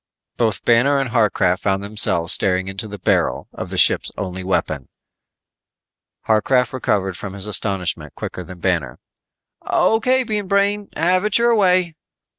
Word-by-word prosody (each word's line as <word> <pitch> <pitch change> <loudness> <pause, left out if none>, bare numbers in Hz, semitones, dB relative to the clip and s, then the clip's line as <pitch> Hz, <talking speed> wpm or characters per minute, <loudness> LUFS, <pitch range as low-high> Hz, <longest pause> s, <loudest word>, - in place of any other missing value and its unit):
Both 110 -5 0
Banner 125 +5 +4
and 135 -3 -2
Harcraft 100 -5 +2
found 95 0 0
themselves 100 -5 0
staring 95 0 +1
into 95 +3 -5
the 105 0 -8
barrel 90 - 0
of - - -6
the - - -4
ship's - - +4
only 95 -2 -5
weapon. 80 -7 -2 1.4
Harcraft 125 +4 +2
recovered 95 -7 -1
from 95 +3 -7
his 100 -1 -5
astonishment 90 -7 -2
quicker 90 - -6
than 90 +1 -12
Banner. 80 -10 -1 0.7
"O.K., 255 +4 +2
Bean 210 -4 -3
Brain, 200 +1 +1
have 180 +4 +1
it 210 -1 +2
your 235 0 +3
way." 185 -5 +2
105 Hz, 145 wpm, -20 LUFS, -, 1.4 s, Banner